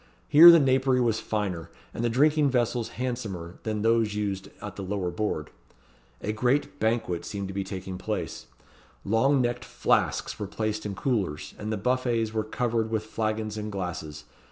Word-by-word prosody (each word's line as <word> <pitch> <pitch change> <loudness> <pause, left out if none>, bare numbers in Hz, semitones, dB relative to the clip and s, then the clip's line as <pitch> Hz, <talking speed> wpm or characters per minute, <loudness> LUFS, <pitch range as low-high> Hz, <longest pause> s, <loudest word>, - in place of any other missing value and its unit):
Here 165 +4 +10
the 170 - +10
napery 130 -2 +3
was 115 -3 +2
finer, 95 -6 -3 0.2
and 115 - -3
the 120 - +2
drinking 145 +4 +3
vessels 120 -2 0
handsomer, 110 -9 -4
than 105 -1 -2
those 115 -2 +2
used 100 -2 -3
at - - -7
the - - -6
lower 95 -2 -2
board. 85 -5 -3 0.7
A 105 - -2
grand 125 +6 +1
banquet 110 -6 0
seemed 100 -1 -5
taking 95 -1 -6
place. 105 +2 -4 0.6
Long 130 +6 +3
necked 120 0 -1
flasks - - 0
were 105 - -3
placed 110 +1 -3
in 100 - -5
coolers, 100 - -2
and 105 +1 -4
the 110 - -1
buffets 120 0 0
were 110 -1 0
covered 115 0 -1
with 110 -1 -1
flagons 110 -1 -2
and 105 0 -4
glasses. 85 -6 -5
110 Hz, 160 wpm, -27 LUFS, 100-120 Hz, 0.7 s, Here